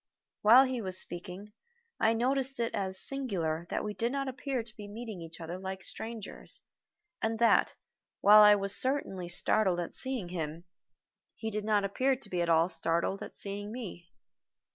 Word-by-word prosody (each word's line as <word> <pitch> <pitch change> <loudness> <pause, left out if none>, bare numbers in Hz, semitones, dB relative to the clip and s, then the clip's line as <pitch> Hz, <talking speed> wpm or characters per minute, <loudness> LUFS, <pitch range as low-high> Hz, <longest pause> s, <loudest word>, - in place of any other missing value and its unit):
While 235 +5 +8
he 255 -2 -2
was 185 -2 0
speaking 180 +4 -7 0.5
I 225 - +4
noticed 265 +3 +1
it 230 -1 -1
as 190 -1 -1
singular 175 -12 -2
that - - -2
we 210 - -3
did 235 +3 -1
not 275 0 -2
appear 260 -1 -3
to 220 -1 -13
be 210 -3 -9
meeting 215 -3 -7
each 165 +1 -9
other 170 +2 -6
like 190 0 -5
strangers, 225 -2 -6 0.6
and 225 0 0
that, 235 +1 +4 0.4
while 210 +1 +8
I 210 0 +8
was 195 -1 +2
certainly 225 -10 0
startled 185 0 +2
at 175 - -4
seeing 255 -9 -3
him, 165 -2 -4 0.7
he 220 0 -4
did 210 0 -3
not 210 -2 +2
appear 260 +7 +1
to 240 -5 -9
be 180 -1 0
at 170 - 0
all 165 0 +5
startled 170 +2 0
at - - -8
seeing 205 +1 -5
me. 195 -8 -7
205 Hz, 175 wpm, -31 LUFS, 180-235 Hz, 0.7 s, While